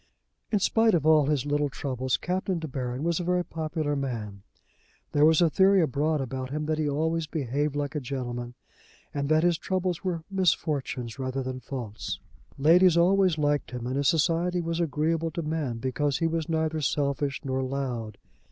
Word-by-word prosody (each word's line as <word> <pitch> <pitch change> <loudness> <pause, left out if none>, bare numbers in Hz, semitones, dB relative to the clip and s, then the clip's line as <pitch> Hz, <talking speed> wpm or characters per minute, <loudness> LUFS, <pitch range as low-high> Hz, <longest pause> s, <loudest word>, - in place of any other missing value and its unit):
In 210 - +3
spite 225 +1 +3
of 155 -3 0
all 155 -3 +5
his 145 -3 +1
little 145 0 +1
troubles 130 -2 -2
Captain 185 +1 -1
De 160 -1 -4
Baron 130 -1 -4
was 170 0 +1
a - - -2
very 180 0 +1
popular 155 -2 -2
man. 115 -8 -4 0.7
There 145 +1 +5
was 160 +2 +5
a 165 - +4
theory 195 +2 +5
abroad 155 -1 +1
about 130 0 -4
him 150 +2 -3
that 155 0 -1
he 150 -1 +1
always 160 +2 0
behaved 145 -1 -1
like 145 0 -2
a 150 - -1
gentleman, 120 -2 -5 0.6
and 140 -1 -2
that 155 +1 +4
his 175 -2 +2
troubles 185 -1 -2
were 175 -4 -2
misfortunes 145 - -1
rather 130 0 -2
than 130 0 -4
faults. 120 -4 -5 0.4
Ladies 170 +4 +5
always 185 -1 +4
liked 145 -1 +1
him, 125 -1 -6
and 130 +2 -2
his 140 0 +1
society 170 +2 +2
was 165 0 -2
agreeable 165 +1 0
to 165 +2 -4
men 150 -6 -2
because 130 +3 -1
he 165 - 0
was 165 0 -1
neither 160 -1 0
selfish 140 0 0
nor 130 0 -1
loud. 130 -5 -3
150 Hz, 180 wpm, -27 LUFS, 130-165 Hz, 0.7 s, all